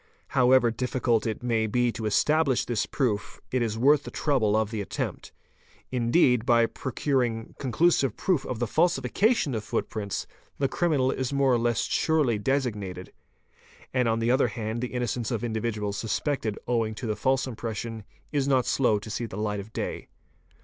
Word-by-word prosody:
However 130 -3 +4
diffi 125 +3 -3
cult 115 -3 +2
it 110 +1 -4
may 115 -2 +1
be 120 +2 +1
to 110 -1 -4
establish 150 +4 +2
this 115 -4 -1
proof, 110 -7 -2
it 130 - +1
1s 110 -2 -1
worth 140 +5 +5
the - - -8
trouble 125 -9 +1
of 110 0 +1
the 110 -2 -2
attempt. 100 - -4 0.6
Indeed, 125 0 +3
by 120 -1 +4
procuring 120 -2 -2
conclusive 135 -2 +2
proof 180 -7 +1
of 125 - -4
the 120 - 0
falsification 165 - +2
of 110 -2 -2
footprints, 105 -1 -3 0.3
the 135 - +1
criminal 140 -3 +1
is 130 0 -2
more 140 -2 +3
or 120 - +3
less 120 0 +1
surely 145 -9 +1
designated; 105 -8 -2 0.8
and 125 -2 +2
on 115 0 +2
the 115 +1 +1
other 130 - +3
hand 115 0 -4
the 125 - -1
innocence 125 -1 -2
of 115 -4 -2
individuals 110 -3 -2
suspected 110 +1 -2
owing 115 -3 0
to 120 - -6
the 110 -2 -1
false 130 +2 +1
impression 115 -2 -5 0.3
is 140 -2 0
not 130 -3 +3
slow 120 -6 +2
to 105 +2 -8
see 115 +2 -3
the 95 - -8
light 105 -1 -1
of 100 +2 -9
day. - - -4
120 Hz, 175 wpm, -27 LUFS, 110-130 Hz, 0.8 s, worth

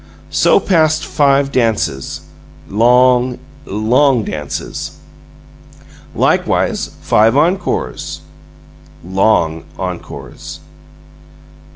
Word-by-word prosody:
So - - +4
passed 160 -4 +2
five 140 -2 +2
dances. 110 - -1 0.5
Long, 125 +3 +3 0.3
long 120 +4 +2
dances. 75 -6 -5 1.2
Likewise - - 0
five 110 +5 +3
encores. 175 +5 -1 0.8
Long 90 -4 +1
encores. 90 -2 -7
120 Hz, 60 wpm, -16 LUFS, 95-140 Hz, 1.2 s, So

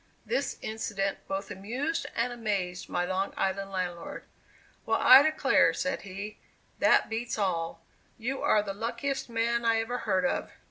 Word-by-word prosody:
This - - -1
incident 210 -3 -2
both 195 0 -3
amused 250 - -3
and 240 +1 0
amazed 200 -6 -2
my 175 - 0
Long 190 +2 -2
Island 195 +1 -1
landlord. 180 -3 -4 0.6
"Well, - - +1
I 260 +2 +9
declare," 310 +1 +3
said 275 0 -1
he, 200 +2 -7 0.4
"that - - +5
beats 230 +2 -3
all; 165 -4 -2 0.3
you 250 +4 -3
are 210 - +3
the 200 -1 -4
luckiest 235 +6 -3
man 235 +1 0
I 230 -1 +3
ever 245 +2 -2
heard 190 +2 +1
of. 270 - -1
215 Hz, 150 wpm, -29 LUFS, 195-240 Hz, 0.6 s, I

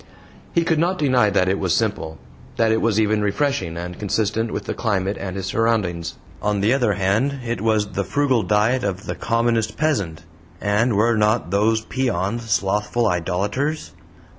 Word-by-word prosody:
He 170 - +2
could 165 -2 +1
not 180 +3 +1
deny 130 -8 +3
that 95 -2 +2
it 95 +1 +1
was 90 -3 +1
simple 80 -8 -2 0.4
that 115 -1 +3
it 110 - +2
was 110 -2 +2
even 110 -1 +2
refreshing 100 - -1
and 90 +1 -6
consistent 110 +2 0
with - - -3
the - - -2
climate 100 -3 -1
and 95 -1 -5
his 95 -1 -4
surroundings. 95 -6 0 0.3
On 105 -1 0
the 105 +5 +3
other 125 -6 +2
hand, 110 +9 0
it 115 -4 -2
was 110 -1 +2
the 100 +1 -2
frugal 130 +3 +1
diet 110 +5 +2
of 95 -1 -3
the - - -3
commonest 115 -1 0
peasant 100 - -1 0.4
and 105 +3 +1
were 115 +3 +3
not 105 -6 +1
those 110 +3 +2
peons 120 -3 -2
slothful 105 +4 +1
idolaters? 105 - -1
105 Hz, 170 wpm, -21 LUFS, 100-120 Hz, 0.4 s, deny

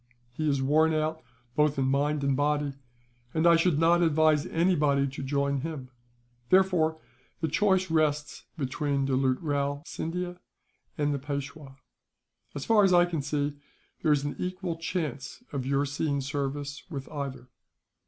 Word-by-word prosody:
He 155 +4 -1
is 140 -2 +1
worn 155 +3 +3
out 155 +1 -1 0.3
both 150 -1 +2
in 135 - +1
mind 140 +2 +1
and 140 -1 +2
body, 145 0 0 0.6
and 160 +1 +2
I 170 0 +7
should 165 -2 +2
not 170 +2 +4
advise 155 -2 +3
anybody 150 -5 +2
to 135 +1 -7
join 140 0 0
him. 140 -3 -6 0.6
Therefore 180 -4 +3 0.4
the 160 - 0
choice 185 +2 +2
rests 150 -2 0
between 140 0 -1
Doulut 130 -1 +1
Rao 145 -1 -1
Scindia 180 +2 -4 0.6
and 145 -1 +1
the 140 - -2
Peishwa; 140 0 -6 0.8
as 140 - -4
far 220 -2 +5
as 190 -2 +4
I 175 0 +6
can 170 -4 -2
see, 145 0 -2 0.4
there 155 - +2
is 145 -2 +3
an 145 - -3
equal 180 -1 -3
chance 160 - -4
of 135 -2 -3
your 140 +1 +2
seeing 145 0 -1
service 145 +1 -3
with 140 -5 -6
either." 135 -4 -6
145 Hz, 155 wpm, -28 LUFS, 140-160 Hz, 0.8 s, I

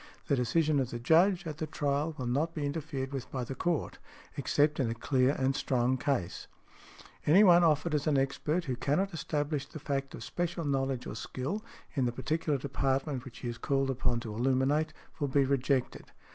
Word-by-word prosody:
The 140 - +4
decision 145 +4 +2
of 130 -3 0
the 120 - -4
Judge 175 +9 +4
at 155 -1 -5
the 155 - -2
trial 145 +1 -1
will 130 - -4
not 145 +7 0
be 150 -2 -2
interfered 140 -2 -3
with 135 -3 -5
by 130 -2 -2
the 125 - -5
Court, 170 +3 -1 0.4
except 150 +1 +2
in 125 -4 +1
a 115 - -2
clear 130 +3 +2
and 135 0 +1
strong 125 -1 +1
case. 130 -9 -2 0.8
Any 180 +8 +7
one 175 -3 +7
offered 160 0 +2
as 150 +1 0
an 150 -2 +3
expert 150 +5 0
who 130 -3 -1
cannot 175 +10 0
establish 145 -2 -2
the 155 - -9
fact 140 -2 -3
of - - -8
special 175 -1 -3
knowledge 135 -2 0
or - - -5
skill, 130 - -4 0.3
in 135 -3 +2
the 120 - +1
particular 150 +4 -1
department 135 0 -1
which 125 -3 -10
he 125 - -4
is 120 -1 -5
called 135 -1 +1
upon 120 -2 0
to 110 -2 -6
illuminate, 135 +6 +1 0.3
will 145 - 0
be 140 0 +3
rejected. 135 -1 0
140 Hz, 195 wpm, -31 LUFS, 130-155 Hz, 0.8 s, Any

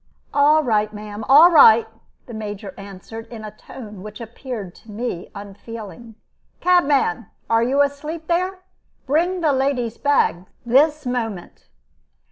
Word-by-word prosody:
"All 300 +2 +4
right, 215 -4 +1
ma'am, 210 0 -8
all 310 +6 +8
right!" 230 -8 +7 0.4
the 240 - -11
Major 205 -3 -6
answered, 200 +3 -10
in 225 -2 -10
a 210 - -7
tone 210 -4 -11
which 210 +1 -10
appeared 230 -4 -7
to 220 - -15
me 210 -5 -5
unfeeling. 215 +2 -10 0.4
"Cabman, 285 - +2 0.2
are 225 0 +4
you 270 +4 +3
asleep 300 +3 -5
there? 365 +3 -1 0.4
Bring 345 +6 0
the 305 -4 +2
lady's 260 -4 -1
bag 190 - +1 0.2
this 295 +5 +3
moment." 225 -7 -5
235 Hz, 130 wpm, -21 LUFS, 210-285 Hz, 0.4 s, all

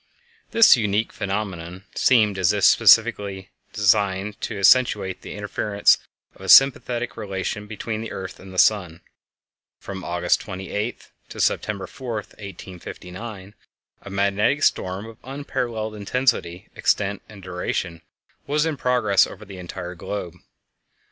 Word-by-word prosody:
_ - - -37
This 230 - +7
unique 105 -1 -1
phenomenon 95 -3 -4
seemed 105 -6 +3
as 90 - +3
if - - -2
specially 95 -2 +4 0.2
designed 100 +1 +1
to 110 - -4
accentuate 100 -3 +3
the - - -8
inference 105 0 +2 0.3
of - - -19
a - - -7
sympathetic 125 -3 +5
relation 105 -1 -4
between 110 +1 -5
the 115 - -6
earth 95 -1 -7
and 95 0 -12
the 95 - -10
sun. 90 -5 +2 0.8
From 95 -2 -7
August 90 0 0
28 105 +4 -5 0.2
to - - -9
September 100 -3 0
4, 125 +4 -7
1859, 100 0 -8 0.5
a - - -10
magnetic 100 +8 +1
storm 95 +3 0
of 115 -1 -11
unparalleled 120 -5 -4
intensity, 105 -4 -1
extent, 100 0 0
and 100 -3 -13
duration 90 -2 -3 0.5
was 150 +2 +1
in 160 -3 -2
progress 125 -7 +3
over - - -11
the 95 -2 -10
entire 90 0 -7
globe. 90 -1 -5
100 Hz, 130 wpm, -23 LUFS, 95-110 Hz, 0.8 s, This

